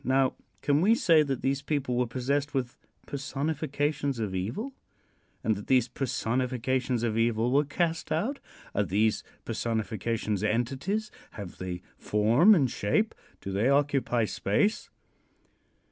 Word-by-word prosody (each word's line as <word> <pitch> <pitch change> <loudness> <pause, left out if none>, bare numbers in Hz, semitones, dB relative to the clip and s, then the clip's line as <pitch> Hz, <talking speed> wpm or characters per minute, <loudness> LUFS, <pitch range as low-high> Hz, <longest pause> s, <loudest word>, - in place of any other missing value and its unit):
Now, 130 +1 +2 0.3
can 145 +1 +3
we 215 +5 +5
say 165 -8 +5
that 135 -4 -2
these 135 +1 +1
people 140 -4 -1
were 125 0 +1
possessed 140 +5 -1
with 125 -2 -1 0.3
personifications 145 0 -2
of 105 -4 -2
evil, 120 - -3 0.7
and 110 - +2
that 100 - -8
these 130 -3 +4
personifications 125 0 -1
of 115 -1 0
evil 115 +1 +2
were 145 +3 +4
cast 165 +2 -1
out? 220 - 0 0.3
Are 105 - +2
these 105 +3 +1 0.2
personifications 110 -2 -2
entities? 135 - -1 0.2
Have 100 -4 -8
they 90 -1 -5 0.2
form 120 - +5
and 140 -7 +3
shape? 125 - 0 0.3
Do 95 - -5
they 105 +7 +2
occupy 140 -4 +2
space? 155 - 0
130 Hz, 130 wpm, -28 LUFS, 110-145 Hz, 0.7 s, we